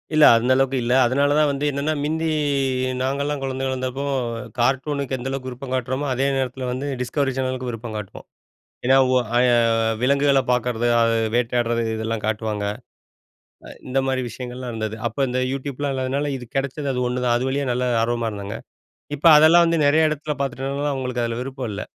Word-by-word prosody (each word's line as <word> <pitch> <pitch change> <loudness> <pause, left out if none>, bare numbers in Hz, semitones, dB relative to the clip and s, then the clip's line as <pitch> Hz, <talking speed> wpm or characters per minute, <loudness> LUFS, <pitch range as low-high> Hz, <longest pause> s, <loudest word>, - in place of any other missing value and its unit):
இல்ல, 155 -1 +7
அந்த 125 +3 0
அளவுக்கு 135 0 +1
இல்ல. 120 +1 +1
அதனாலதான் 145 +4 +2
வந்து 140 +1 -2
என்னன்னா, 140 +3 -1
மிந்தி 160 +2 -1 0.7
நாங்கல்லாம் 140 +2 -1
குழந்தைகளா 135 0 -2
இருந்தப்போ 130 +1 -3 0.6
கார்ட்டூனுக்கு 135 +2 0
எந்த 125 +2 -5
அளவுக்கு 130 -1 -4
விருப்பம் 130 +1 -7
காட்றோமோ, 130 +3 -2
அதே 135 +2 0
நேரத்துல 130 -1 -2
வந்து, 130 +3 -3 0.2
டிஸ்கவரி 135 +2 0
சேனலுக்கும் 130 -1 -2
விருப்பம் 115 -1 -7
காட்டுவோம். 105 -3 -8 0.6
ஏன்னா, 135 +1 +5
உ - - +2 0.2
அய 125 - +4 0.6
விலங்குகளப் 140 0 +2
பார்க்றது, 120 -1 0
அது 115 0 +3 0.2
வேட்டையாடுறது 120 -1 +1
இதெல்லாம் 110 -1 -3
காட்டுவாங்க. 110 -1 -2 1.0
அ - - -10 0.2
இந்த 130 +1 0
மாரி 130 -1 0
விஷயங்கள்லாம் 125 +2 -7
இருந்தது. 110 -1 -3
அப்ப 135 +3 -1
இந்த 125 +1 -1
YouTubeலாம் 140 +1 -3
இல்லாததுனால, 135 +3 -1
இது 125 - -9
கெடச்சது 140 +1 -2
அது 125 - -1
ஒன்னுதான். 125 -1 0
அது 130 +2 -2
வழியா 140 +1 -1
நல்ல 125 +1 0 0.2
ஆர்வமா 115 -1 -1
இருந்தாங்க. 100 +1 -6 0.6
இப்ப 160 +4 +3
அதெல்லாம் 165 +3 +7
வந்து 165 -1 +1
நெறைய 155 +2 +4
எடத்துல 150 0 -3
பாத்துட்டதுனால, 135 +2 -2
அவங்களுக்கு 125 -2 -2
அதுல 115 +1 -3
விருப்பம் 130 -3 -5
இல்ல. 100 - -4
130 Hz, 165 wpm, -22 LUFS, 120-140 Hz, 1.0 s, இல்ல